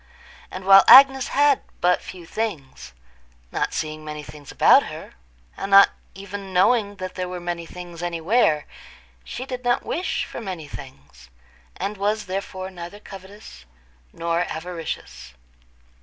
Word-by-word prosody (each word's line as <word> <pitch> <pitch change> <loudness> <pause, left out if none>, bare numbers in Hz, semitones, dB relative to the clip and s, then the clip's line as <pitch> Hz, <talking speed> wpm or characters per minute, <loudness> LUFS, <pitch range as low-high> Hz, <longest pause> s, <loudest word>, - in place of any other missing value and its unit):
And 185 0 -8
while 195 0 +8
Agnes 270 0 +8
had 285 -1 +3 0.2
but 180 +1 +2
few 180 -2 -10
things—not 60 - -6
seeing 155 0 -4
many 150 0 -7
things 145 -2 -12
about - - +5
her, - - -10 0.4
and 195 - -5
not 195 0 +8 0.3
even 195 0 -8
knowing 205 +3 +2
that 185 -1 -6
there 185 -1 -4
were 180 0 -5
many 175 -1 -5
things 175 -1 -10
anywhere, 170 -1 +1 0.6
she 255 - -7
did 255 -1 -6
not 245 0 0
wish 325 -2 -2
for - - -8
many 185 -8 -6
things, 70 - -12 0.5
and 200 +3 -4
was 210 +2 -1
therefore 190 0 -5
neither 175 +2 -9
covetous 195 - -13 0.5
nor 170 0 -2
avaricious. 160 - -7
185 Hz, 135 wpm, -23 LUFS, 155-205 Hz, 0.6 s, while